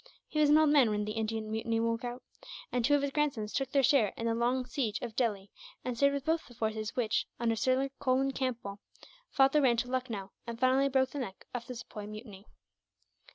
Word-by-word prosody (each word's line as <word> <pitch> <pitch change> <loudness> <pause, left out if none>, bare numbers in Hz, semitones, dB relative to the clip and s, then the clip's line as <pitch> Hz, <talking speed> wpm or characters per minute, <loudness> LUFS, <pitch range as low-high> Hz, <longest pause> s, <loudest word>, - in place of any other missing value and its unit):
He 305 - -2
was 300 -1 +5
an 300 - +7
old 310 -1 +5
man 275 -6 +5
when 210 0 -1
the 215 - -3
Indian 220 0 -3
mutiny 225 +1 -1
broke 230 +1 0
out, 245 +1 -5 0.5
and 245 - 0
two 290 +5 +4
of 285 - +1
his 280 - -1
grandsons 270 -8 -1
took 270 -1 -1
their 275 -1 +3
share 260 -6 +4
in 230 - -3
the 230 - +2
long 245 +2 +1
siege 240 -6 -2
of 235 -3 -6
Delhi, 205 -6 -1 0.3
and 250 - -2
served 280 +3 +3
with 275 -1 -4
both 320 0 0
the 245 - -15
forces 220 0 -2
which, 225 -4 0
under 230 -1 +1
Sir 260 +4 +1
Colin 270 0 +2
Campbell, 240 -7 -3 0.5
fought 270 0 +4
their 300 - +4
way 265 - +5
into 245 +1 0
Lucknow, 230 -7 -3 0.2
and 230 0 -5
finally 260 +2 +3
broke 260 -1 +2
the 290 - -4
neck 195 -7 -6
of 235 -2 -5
the 250 - -6
Sepoy 210 -3 -8
mutiny. 215 -2 -10
245 Hz, 225 wpm, -31 LUFS, 220-270 Hz, 0.5 s, an